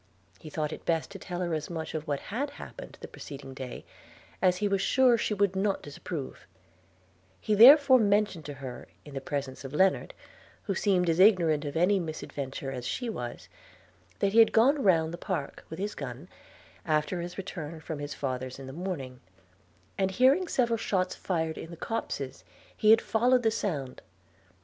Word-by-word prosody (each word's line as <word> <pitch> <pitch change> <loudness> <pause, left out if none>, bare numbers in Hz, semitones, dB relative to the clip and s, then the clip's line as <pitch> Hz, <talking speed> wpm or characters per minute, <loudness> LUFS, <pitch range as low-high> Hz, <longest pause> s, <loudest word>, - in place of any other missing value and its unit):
He 155 - -10
thought 150 0 -2
it - - -9
best 165 -1 -1
to - - -8
tell 180 -1 -5
her 170 -2 -1
as 155 -1 -3
much 165 -2 -5
of 155 -1 -4
what 145 -2 -1
had 275 +5 -1
happened - - -10
the - - -7
preceding 135 -2 -9
day, 130 -1 -7 0.6
as 180 -1 +3
he 205 - 0
was 195 -1 +1
sure 255 +2 +4
she 215 -2 -1
would 200 -1 +1
not 195 +1 0
disapprove: 145 0 -7 0.9
he 215 - -1
therefore 260 +4 +9
mentioned 205 -6 +1
to 145 - -6
her, 130 -2 -8 0.2
in 145 - -11
the 135 - -4
presence 140 -2 -4
of 135 0 -8
Lennard, 190 +3 +2 0.5
who 200 - -1
seemed 185 -2 +2
as 165 +1 +1
ignorant 170 -7 +5
of 145 +2 -3
any 190 +4 +3
misadventure 140 -5 -5
as 125 -2 -5
she 245 -2 -3
was, 120 - -6 0.7
that 200 0 0
he 230 - +6
had 225 - +7
gone 270 +6 +4
round 165 -5 +3
the 170 - -6
park 170 -9 -4
with 160 - -7
his 205 +3 -3
gun, 125 +7 -7 0.6
after 155 +2 0
his 175 +1 -7
return 165 -5 -6
from 155 -1 -6
his 145 0 -5
father's 130 -1 -4
in 135 - -9
the 135 - -8
morning, 145 -7 -5 0.8
and, 190 -1 +2
hearing 265 - +3
several 235 -6 +1
shot 185 -4 0
fired 160 -3 -2
in 165 - -8
the 170 - -9
copses, 145 - -4 0.3
he 215 - +2
had 225 +1 +7
followed 245 +3 +2
the 225 - +3
sound. 150 - -3
175 Hz, 185 wpm, -29 LUFS, 145-205 Hz, 0.9 s, therefore